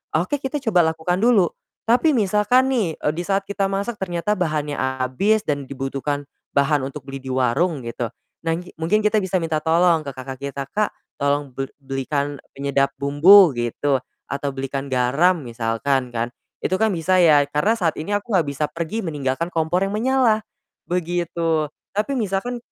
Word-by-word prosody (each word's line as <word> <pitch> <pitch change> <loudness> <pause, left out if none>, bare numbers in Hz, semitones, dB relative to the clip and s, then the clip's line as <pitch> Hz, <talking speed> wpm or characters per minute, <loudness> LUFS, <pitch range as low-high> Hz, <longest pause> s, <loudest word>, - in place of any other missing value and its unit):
Oke, 225 - 0
kita 270 +3 -2
coba 180 -8 +3
lakukan 175 +3 -1
dulu. 220 -8 +4 0.3
Tapi 250 +7 +4
misalkan 215 +6 +3
nih, 220 -8 +1
eee, 150 - -1
di 170 - -3
saat 195 +2 0
kita 195 -1 -1
masak 200 +2 -3
ternyata 180 +3 -1
bahannya 155 -5 -1
habis 130 +12 +1
dan 140 -3 -2
dibutuhkan 140 +1 -3 0.2
bahan 140 0 +2
untuk 135 +1 -6
beli 135 -1 -7
di 130 - -8
warung 130 +3 +1
gitu. 115 0 -3 0.3
Nah 165 0 0
nggi 180 +1 -10
mungkin 210 +7 +1
kita 210 0 +3
bisa 190 0 0
minta 160 -3 -1
tolong 165 0 +3
ke 140 - -6
kakak 130 0 -7
kita, 140 0 -4
"Kak, 210 0 +1 0.3
tolong 140 -1 0
bel 135 +1 -4
belikan 140 +1 -3 0.2
penyedap 140 -1 +1
bumbu," 155 +5 +7
gitu. 125 +3 0 0.3
Atau, 140 0 -3
"belikan 135 +1 -4
garam," 140 +7 +2
misalkan 120 +3 -1
kan. 120 0 -3 0.3
Itu 185 - 0
kan 220 - +4
bisa 185 +3 +2
ya, 150 -4 +6
karena 205 +10 +2
saat 165 -6 0
ini 205 +5 -1
aku 210 +3 -9
enggak 170 -6 +3
bisa 140 +2 -1
pergi 170 +7 -3
meninggalkan 150 +2 -2
kompor 165 +3 +1
yang 195 - -3
menyala. 235 -1 +2 0.5
Begitu. 170 -3 0 0.3
Tapi 215 +7 -1
misalkan 220 +3 -1
160 Hz, 170 wpm, -22 LUFS, 140-195 Hz, 0.5 s, bumbu